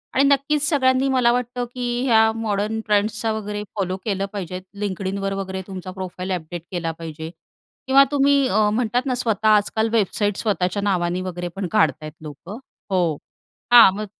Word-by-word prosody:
आणि 270 - +4
नक्कीच 285 +1 +2
सगळ्यांनी 260 -2 +2
मला 250 -2 +3
वाटतं, 245 0 -2
की 245 0 -3
ह्या 220 -3 +5
मॉडर्न 215 0 -2
ट्रेंड्सचा 215 +2 +1
वगैरे 210 -1 -4
फॉलो 185 -2 -1
केलं 195 -3 -1
पाहिजे. 185 -2 -5 0.2
LinkedInवर 195 0 -2
वगैरे 190 -1 -4
तुमचा 185 -2 -7
प्रोफाईल 185 0 -6
अपडेट 175 -1 -4
केला 170 -2 -2
पाहिजे 160 -1 -7 0.6
किंवा 275 +1 +7
तुम्ही 280 -1 +3
अ, 210 +1 +2
म्हणतात 245 +2 0
ना 255 -2 0
स्वतः 220 -3 0
आजकाल 215 +1 +2
वेबसाईट 205 -1 +1
स्वतःच्या 200 -2 -1
नावाने 180 -2 0
वगैरे 175 -1 -4
पण 195 -1 -3
काढतायत 155 -7 +1
लोकं. 160 - -9 0.3
हो. 175 -5 +1 0.6
हा 235 -4 +10
मग 210 +2 -4
205 Hz, 155 wpm, -22 LUFS, 185-240 Hz, 0.6 s, हा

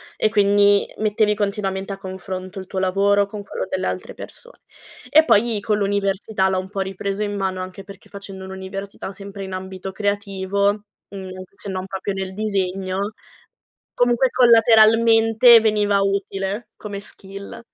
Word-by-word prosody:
e 215 - +1
quindi 205 -1 +4
mettevi 215 0 +2
continuamente 200 -2 -2
a - - -7
confronto, 190 0 -7
il 190 - -9
tuo 190 - -7
lavoro 200 +2 +2
con 205 +1 -8
quello - - -5
delle - - -2
altre - - -4
persone. - - -12 0.5
E 315 +1 +6
poi 220 -2 +3
con 210 0 0
l'università 200 0 0
l'ho 190 -1 0
un 185 - -7
po' 195 -1 -3
ripreso 195 +2 -3
in 205 0 -3
mano, 190 -2 -2
anche 185 +1 -9
perché 195 0 -14
facendo 195 -1 -9
l'università 190 +1 -7
sempre 200 0 -9
in 190 -1 -7
ambito 190 0 -6
creativo, 200 0 -1 0.3
mhmm, 190 -2 -8 0.3
se 200 - -8
non 185 0 -4
proprio 195 +1 -4
nel 190 -1 -5
disegno, 195 -1 -2 0.8
comunque 245 +1 +3
collateralmente 225 0 +6
veniva 210 -2 +2
utile 195 +2 -2
come 205 -2 -6
skill. 195 0 -9
200 Hz, 150 wpm, -21 LUFS, 190-210 Hz, 0.8 s, E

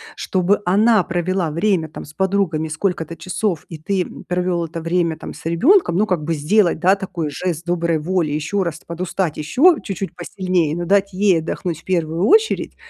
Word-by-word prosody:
чтобы 190 +2 0
она 210 +3 +4
провела 175 -1 -1
время 170 0 +1
там - - -9
с 150 - -14
подругами 190 -4 0
сколько-то 165 0 -2
часов 175 +1 -2
и 165 - -7
ты 185 +4 -1 0.2
провел 180 -1 0
это 165 +1 -6
время 165 0 0
там 160 - -8
с - - -14
ребенком. 170 - +3
Ну, 210 +3 +2
как 175 -6 -1
бы 165 +2 -1
сделать, 170 +4 +2
да, 185 +4 +4
такой 180 -5 -4
жест 165 +3 -3
доброй 170 -2 0
воли, 170 -1 0
еще 155 +7 -1
раз 170 -3 -4
подустать 170 -1 -3
еще 275 - +4
чуть-чуть 195 -3 -5
посильнее, 175 -3 -1
но 175 0 -3
дать 200 +1 +2
ей 190 -2 +3
отдохнуть 165 0 -4
в - - -34
первую 170 -1 0
очередь. 440 +2 +3
175 Hz, 180 wpm, -20 LUFS, 165-195 Hz, 0.2 s, она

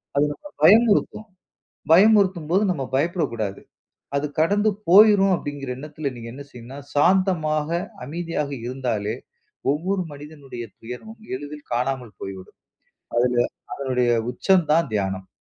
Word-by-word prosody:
அது 140 - +4
நம்ம 295 - -14
பயமுறுத்தும். 215 +3 +4 0.6
பயமுறுத்தும் 190 -3 +5
போது 195 +4 +3
நம்ம 140 -6 -3
பயப்படக்குடாது. 135 - -1 0.6
அது 140 - -1
கடந்து 205 +6 +3 0.2
போயுரும் 195 0 +7
அப்டிங்குற 145 -4 -5
என்னத்துல 150 0 -5
நீங்க 115 -1 -8
என்ன 140 +1 -8
செய்யணும்னா, 125 +3 -10
சாந்தமாக, 155 -2 +2 0.4
அமைதியாக 160 -1 -3 0.2
இருந்தாலே, 120 -5 -2 0.6
ஒவ்வொரு 185 +6 -1
மனிதனுடைய 145 -4 -9 0.2
துயரமும் 215 - -9
எளிதில் 145 +2 -9
காணாமல் 125 -4 -2
போய் 95 0 -5
விடும். 95 - -14 0.6
அதுல 125 +1 +2 0.4
அதனுடைய 125 -3 0 0.2
உச்சம் 190 -4 +2
தான் 165 -2 +3
தியானம். 95 -2 -2
150 Hz, 115 wpm, -23 LUFS, 125-185 Hz, 0.6 s, போயுரும்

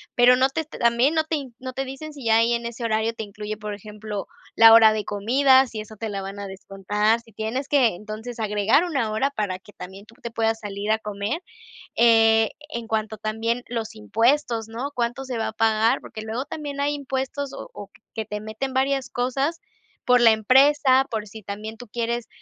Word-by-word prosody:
pero 245 +1 +6
no 260 - +4
te 320 +4 -2
también 245 -2 +1
no 315 - +3
te 305 -4 -3
no 255 0 -6
te 270 - -2
dicen 270 +4 -8
si 280 -3 -10
ya 225 0 +4
ahí 230 +1 +3
en 235 0 -2
ese 235 +1 -7
horario 220 0 0
te 225 - -6
incluye, 210 +1 -6
por 210 0 -5
ejemplo, 210 0 -7 0.3
la 225 0 +9
hora 220 -1 +8
de 215 -1 -2
comida. 260 +6 +4
Si 225 -4 -6
eso 215 +1 -11
te 225 - -4
la 200 -1 -4
van 195 +1 -7
a 200 - -5
descontar. 200 +3 -1
Si 230 -1 -20
tienes 225 +6 -3
que, 255 -10 +3
entonces, 215 +5 -8
agregar 215 - +2
una 270 -11 -1
hora 265 +6 0
para 205 -7 -2
que 205 - -18
también 190 +3 -10
tú 225 - -19
te 235 - -5
puedas 225 -1 0
salir 205 0 -4
a 220 - +2
comer. 210 - -3 0.5
Eh, 225 -1 +5 0.2
en 235 -6 -5
cuanto 220 -1 -2
también 225 +3 -2
los 225 -2 -4
impuestos, 225 +2 +1
¿no? 240 +6 -5
¿Cuánto 240 +2 -2
se 255 -3 -4
va 220 - -1
a - - -9
pagar? 225 +3 +2
Porque 215 - -9
luego 225 +5 -4
también 290 -2 -5
hay 290 +1 0
impuestos, 270 0 -4
o - - -8
o 200 - -9 0.3
que 220 - -3
te 210 0 -5
meten 220 +5 -5
varias 270 +1 0
cosas 270 +6 -1 0.4
por 250 0 +4
la 235 -2 +7
empresa, 265 +4 +4
por 215 -2 -3
si 215 +2 -11
también 210 +3 -7
tú 245 +1 -11
quieres, 235 +1 -3
225 Hz, 210 wpm, -24 LUFS, 215-260 Hz, 0.5 s, la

